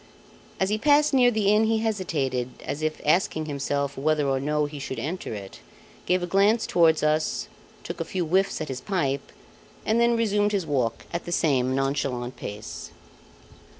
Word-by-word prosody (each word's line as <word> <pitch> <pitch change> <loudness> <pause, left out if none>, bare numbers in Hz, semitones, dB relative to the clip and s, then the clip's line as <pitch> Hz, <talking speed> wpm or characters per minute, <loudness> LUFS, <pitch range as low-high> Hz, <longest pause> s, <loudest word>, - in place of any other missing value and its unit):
As 190 - +1
he 215 +1 0
passed 295 +3 +4
near 250 -2 +6
the 210 -3 +2
inn, 215 +1 +4
he 225 0 +2
hesitated, 160 - -1 0.2
as 145 - -4
if 155 0 -2
asking 155 0 +2
himself 140 -1 -2
whether 150 +1 +1
or 135 -1 +1
no 150 +2 0
he 145 0 -7
should 135 -1 -5
enter 155 +11 -4
it; 100 -2 -9 0.5
gave 180 0 +2
a - - +1
glance 200 +5 +3
towards 165 -3 +3
us, 155 +1 0 0.4
took - - -6
a - - -2
few 180 0 -2
whiffs 190 +4 +1
at 155 - -3
his 130 -1 -5
pipe, 140 -6 -2 0.5
and 225 +2 +2
then 235 0 +3
resumed 210 -2 +1
his 195 -4 0
walk 130 -6 -1
at 170 - -3
the 175 - -5
same 130 -6 +2
nonchalant 135 -2 -1
pace. 105 +1 -7
155 Hz, 180 wpm, -25 LUFS, 140-200 Hz, 0.5 s, near